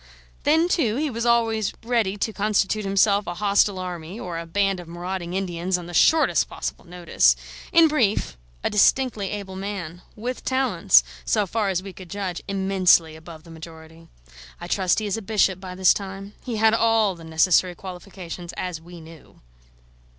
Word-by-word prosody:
Then, 320 Hz, +3 st, +4 dB
too, 255 Hz, -, +1 dB
he 295 Hz, +2 st, -1 dB
was 235 Hz, 0 st, -2 dB
always 225 Hz, -3 st, +1 dB
ready 225 Hz, -4 st, 0 dB
to 220 Hz, +2 st, -2 dB
constitute 210 Hz, 0 st, 0 dB
himself 200 Hz, 0 st, +2 dB
a 175 Hz, -, -4 dB
hostile 200 Hz, 0 st, +2 dB
army 180 Hz, +1 st, -6 dB
or 175 Hz, -5 st, -5 dB
a 170 Hz, -, -8 dB
band 195 Hz, +2 st, 0 dB
of 175 Hz, -, -10 dB
marauding 175 Hz, +1 st, -5 dB
Indians 180 Hz, -1 st, -1 dB
on 175 Hz, -, -8 dB
the 175 Hz, -, -9 dB
shortest 320 Hz, -, +3 dB
possible -, -, -6 dB
notice: 175 Hz, -1 st, +2 dB, 0.4 s
in 335 Hz, -2 st, +6 dB
brief, 220 Hz, -, 0 dB, 0.3 s
a -, -, +1 dB
distinctly 210 Hz, -1 st, +2 dB
able 200 Hz, -2 st, -6 dB
man, 190 Hz, -3 st, -6 dB
with 245 Hz, +4 st, -5 dB
talents, 265 Hz, 0 st, +3 dB, 0.2 s
so 210 Hz, -2 st, +1 dB
far 210 Hz, +1 st, -1 dB
as 185 Hz, -1 st, -1 dB
we 195 Hz, -1 st, -9 dB
could 185 Hz, -2 st, -12 dB
judge, 190 Hz, -2 st, -4 dB
immensely 190 Hz, -4 st, +3 dB
above 160 Hz, 0 st, -12 dB
the 165 Hz, -, -14 dB
majority. 160 Hz, 0 st, -12 dB, 0.5 s
I -, -, -7 dB
trust 185 Hz, -3 st, +1 dB
he 215 Hz, -, -1 dB
is 205 Hz, +1 st, -1 dB
a -, -, -5 dB
bishop 195 Hz, -3 st, +1 dB
by 185 Hz, -1 st, -8 dB
this 185 Hz, -1 st, +5 dB
time, 195 Hz, 0 st, -7 dB
he 245 Hz, -3 st, -4 dB
had 220 Hz, 0 st, +4 dB
all 225 Hz, -3 st, +3 dB
the 170 Hz, -2 st, -13 dB
necessary 175 Hz, +3 st, +2 dB
qualifications, 180 Hz, -1 st, -9 dB
as 180 Hz, -3 st, -5 dB
we 175 Hz, 0 st, -12 dB
knew. 160 Hz, -1 st, -15 dB
195 Hz, 175 wpm, -23 LUFS, 175-215 Hz, 0.5 s, in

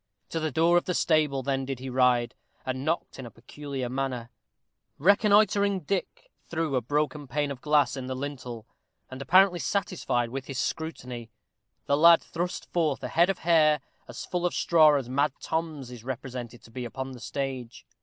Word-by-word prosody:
To 165 Hz, -, -2 dB
the 155 Hz, 0 st, -1 dB
door 165 Hz, +3 st, +3 dB
of 175 Hz, -, +1 dB
the 180 Hz, -, -1 dB
stable 150 Hz, -4 st, +2 dB
then 135 Hz, 0 st, -1 dB
did 135 Hz, 0 st, -4 dB
he 130 Hz, +2 st, -8 dB
ride, 125 Hz, -2 st, +2 dB, 0.3 s
and 130 Hz, 0 st, -3 dB
knocked 160 Hz, -2 st, -2 dB
in 130 Hz, -, -6 dB
a -, -, -9 dB
peculiar 135 Hz, +2 st, -6 dB
manner. 125 Hz, -2 st, -3 dB, 0.7 s
Reconnoitering 200 Hz, +2 st, +4 dB
Dick 180 Hz, +5 st, -4 dB, 0.2 s
through 160 Hz, -4 st, -1 dB
a 125 Hz, -, +2 dB
broken 145 Hz, +3 st, -1 dB
pane 145 Hz, +3 st, -1 dB
of 130 Hz, -3 st, -7 dB
glass 150 Hz, -1 st, +2 dB
in 130 Hz, -2 st, -5 dB
the 130 Hz, -, -3 dB
lintel, 130 Hz, -4 st, -6 dB, 0.5 s
and 130 Hz, +1 st, -7 dB
apparently 180 Hz, +5 st, +5 dB
satisfied 165 Hz, -, -1 dB
with 135 Hz, 0 st, -5 dB
his 135 Hz, -, -5 dB
scrutiny, 125 Hz, -7 st, -4 dB, 0.6 s
the 140 Hz, -, +2 dB
lad 170 Hz, +2 st, +7 dB
thrust 175 Hz, +1 st, -4 dB
forth 160 Hz, -5 st, 0 dB
a -, -, -3 dB
head 170 Hz, +3 st, +3 dB
of 195 Hz, -, 0 dB
hair 155 Hz, -3 st, +4 dB, 0.3 s
as -, -, -7 dB
full 180 Hz, -1 st, -3 dB
of 175 Hz, -, 0 dB
straw 155 Hz, -3 st, +5 dB
as 135 Hz, -4 st, -1 dB
Mad 140 Hz, +4 st, +1 dB
Tom's 160 Hz, -6 st, -3 dB
is 120 Hz, -3 st, -10 dB
represented 125 Hz, -2 st, -6 dB
to 115 Hz, -, -16 dB
be 125 Hz, +2 st, -5 dB
upon 130 Hz, +3 st, -5 dB
the 125 Hz, -, -10 dB
stage. 130 Hz, -3 st, -5 dB
140 Hz, 185 wpm, -27 LUFS, 130-165 Hz, 0.7 s, lad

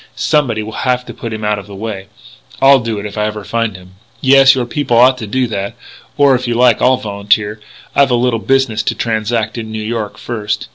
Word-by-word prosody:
Somebody 125 Hz, -8 st, 0 dB
will 110 Hz, -, -7 dB
have 125 Hz, -1 st, 0 dB
to -, -, -9 dB
put 115 Hz, -, -7 dB
him 110 Hz, -1 st, -4 dB
out 105 Hz, -1 st, 0 dB
of 100 Hz, -, -11 dB
the 100 Hz, -, -10 dB
way. 100 Hz, -2 st, -6 dB, 0.5 s
I'll 135 Hz, 0 st, +6 dB
do 115 Hz, -3 st, -3 dB
it 100 Hz, -, -5 dB
if 105 Hz, +1 st, -6 dB
I 105 Hz, -, +1 dB
ever 105 Hz, -1 st, -5 dB
find 115 Hz, -1 st, -2 dB
him." 90 Hz, 0 st, -15 dB, 0.2 s
"Yes.... 135 Hz, 0 st, +6 dB
Your 125 Hz, -2 st, -1 dB
people 125 Hz, -1 st, -1 dB
ought 130 Hz, +2 st, +6 dB
to 110 Hz, -, -6 dB
do 130 Hz, +4 st, 0 dB
that.... 100 Hz, -4 st, -4 dB, 0.4 s
Or, 140 Hz, -1 st, +5 dB
if 125 Hz, 0 st, -1 dB
you 120 Hz, -, -1 dB
like, 120 Hz, -2 st, +4 dB
I'll 130 Hz, 0 st, +4 dB
volunteer.... 105 Hz, 0 st, -1 dB, 0.4 s
I've 140 Hz, -1 st, +4 dB
a 125 Hz, -, +2 dB
little 120 Hz, -1 st, +1 dB
business 130 Hz, -3 st, +1 dB
to -, -, -2 dB
transact 110 Hz, 0 st, -2 dB
in 110 Hz, -1 st, -7 dB
New 110 Hz, 0 st, -4 dB
York, 110 Hz, -1 st, -4 dB
first.... 110 Hz, -3 st, -4 dB
115 Hz, 230 wpm, -15 LUFS, 105-125 Hz, 0.5 s, I'll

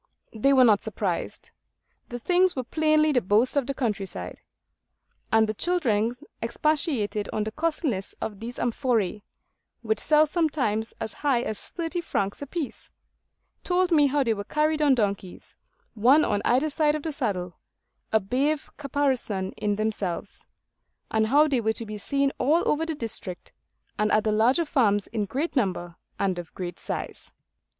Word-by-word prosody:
They 230 Hz, +5 st, +2 dB
were 265 Hz, -2 st, +6 dB
not 215 Hz, -4 st, +5 dB
surprised. -, -, -3 dB, 0.6 s
The 240 Hz, -, -4 dB
things 360 Hz, +8 st, +2 dB
were 260 Hz, -, -2 dB
plainly 310 Hz, +3 st, +2 dB
the 250 Hz, -4 st, +2 dB
boast 215 Hz, +7 st, +2 dB
of 275 Hz, -3 st, +1 dB
the 275 Hz, -, -2 dB
countryside. 210 Hz, -7 st, -3 dB, 0.9 s
And 220 Hz, 0 st, +4 dB
the 215 Hz, -, -1 dB
children 235 Hz, -, +1 dB, 0.3 s
expatiated 235 Hz, -4 st, 0 dB
on 215 Hz, -, -1 dB
the 215 Hz, -, -4 dB
costliness 300 Hz, -, -2 dB
of 205 Hz, -3 st, -5 dB
these 235 Hz, +2 st, -6 dB
amphoræ, 230 Hz, -5 st, 0 dB, 0.6 s
which 220 Hz, -1 st, 0 dB
sell 305 Hz, 0 st, +4 dB
sometimes 280 Hz, -, -1 dB
as 220 Hz, -2 st, -4 dB
high 265 Hz, -5 st, +2 dB
as 215 Hz, -, -5 dB
thirty 340 Hz, +1 st, -3 dB
francs 200 Hz, -, -2 dB
apiece; 285 Hz, 0 st, -5 dB, 0.7 s
told 360 Hz, 0 st, +1 dB
me 295 Hz, -3 st, +5 dB
how 280 Hz, +1 st, +1 dB
they 230 Hz, -3 st, +1 dB
were 200 Hz, -1 st, -5 dB
carried 305 Hz, +6 st, 0 dB
on 285 Hz, -3 st, +5 dB
donkeys, 200 Hz, -5 st, -3 dB, 0.4 s
one 250 Hz, +8 st, +5 dB
on 205 Hz, -, 0 dB
either 270 Hz, +6 st, +2 dB
side 300 Hz, 0 st, +2 dB
of 305 Hz, -, -4 dB
the 320 Hz, -, -2 dB
saddle, 195 Hz, -11 st, -3 dB, 0.5 s
a 220 Hz, -, +4 dB
brave 270 Hz, +9 st, -1 dB
caparison 265 Hz, -9 st, -1 dB
in 205 Hz, -1 st, -1 dB
themselves; 210 Hz, -4 st, -3 dB, 0.7 s
and 220 Hz, 0 st, +2 dB
how 295 Hz, +6 st, +5 dB
they 265 Hz, -5 st, +1 dB
were 220 Hz, 0 st, +1 dB
to 230 Hz, -, -4 dB
be 210 Hz, -1 st, -6 dB
seen 275 Hz, +6 st, +1 dB
all 305 Hz, +7 st, +2 dB
over 320 Hz, +2 st, +1 dB
the 320 Hz, -, -2 dB
district, 220 Hz, -8 st, -4 dB, 0.5 s
and 210 Hz, 0 st, +2 dB
at 215 Hz, -, +3 dB
the 215 Hz, -, +1 dB
larger 240 Hz, +10 st, +3 dB
farms 205 Hz, -9 st, +2 dB
in 210 Hz, -2 st, -2 dB
great 285 Hz, -, -3 dB
number 180 Hz, -8 st, -1 dB, 0.2 s
and 190 Hz, -3 st, 0 dB
of 170 Hz, -2 st, -8 dB
great 180 Hz, -2 st, -5 dB
size. -, -, -5 dB
240 Hz, 160 wpm, -26 LUFS, 210-295 Hz, 0.9 s, were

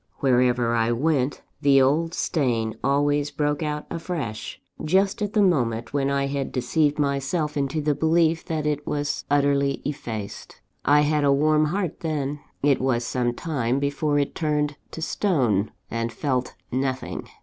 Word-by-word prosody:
Wherever 125 Hz, -2 st, +2 dB
I 115 Hz, 0 st, +2 dB
went, 135 Hz, +2 st, 0 dB, 0.2 s
the 140 Hz, -1 st, +5 dB
old 155 Hz, +6 st, +2 dB
stain 120 Hz, -8 st, 0 dB
always 145 Hz, +2 st, +2 dB
broke 150 Hz, 0 st, -1 dB
out 150 Hz, -1 st, -2 dB
afresh, 160 Hz, -, -4 dB, 0.2 s
just 190 Hz, +5 st, +2 dB
at 205 Hz, 0 st, -2 dB
the 210 Hz, -, +4 dB
moment 120 Hz, -, +1 dB
when 140 Hz, -1 st, +1 dB
I 140 Hz, 0 st, +1 dB
had 140 Hz, -1 st, -2 dB
deceived 145 Hz, +4 st, +1 dB
myself 145 Hz, +2 st, 0 dB
into 140 Hz, +2 st, -1 dB
the 150 Hz, 0 st, +1 dB
belief 160 Hz, +2 st, +2 dB
that 155 Hz, -2 st, -2 dB
it 150 Hz, -1 st, -1 dB
was 145 Hz, -1 st, -2 dB
utterly 140 Hz, -1 st, +2 dB
effaced. 115 Hz, -8 st, -6 dB, 0.2 s
I 145 Hz, +1 st, +5 dB
had 150 Hz, 0 st, +2 dB
a 140 Hz, -, +4 dB
warm 155 Hz, +2 st, +3 dB
heart 180 Hz, +1 st, -2 dB
then 150 Hz, -3 st, -2 dB, 0.2 s
it 140 Hz, -3 st, +3 dB
was 120 Hz, -2 st, +1 dB
some 120 Hz, -1 st, -1 dB
time 130 Hz, -7 st, -1 dB
before 145 Hz, +1 st, 0 dB
it 140 Hz, -1 st, 0 dB
turned 150 Hz, -2 st, 0 dB
to 160 Hz, -, -6 dB
stone, 125 Hz, -, +1 dB, 0.2 s
and 115 Hz, 0 st, -2 dB
felt 130 Hz, -1 st, -2 dB, 0.2 s
nothing. 130 Hz, 0 st, -2 dB
145 Hz, 155 wpm, -24 LUFS, 130-155 Hz, 0.2 s, the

